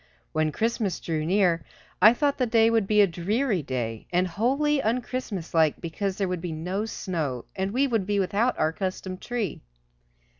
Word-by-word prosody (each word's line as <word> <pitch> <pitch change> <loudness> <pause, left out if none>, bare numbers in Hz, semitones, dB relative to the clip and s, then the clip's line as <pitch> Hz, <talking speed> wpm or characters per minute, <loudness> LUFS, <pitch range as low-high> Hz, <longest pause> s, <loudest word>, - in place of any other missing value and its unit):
When 155 0 +1
Christmas 225 -1 -1
drew 155 -2 -2
near 180 -3 +2 0.4
I 215 - +9
thought 285 +1 +1
the 250 - +2
day 225 0 +4
would 225 -4 +2
be 210 0 +5
a - - +6
very 175 -2 -7
dreary 215 0 +1
day, 120 -5 -4
and 180 +1 +2
wholly 275 - +1
unChristmaslike 210 - 0
because 185 +3 -3
there 195 - 0
would 180 -2 -3
be 175 -1 -4
no 180 +7 -2
snow, 160 - -3
and 190 0 -1
we 255 +7 +2
would 225 -7 0
be 205 -1 +1
without 205 +6 +1
our 155 - +2
accustomed 185 +2 -4
tree. 235 -8 -3
195 Hz, 180 wpm, -26 LUFS, 170-230 Hz, 0.4 s, I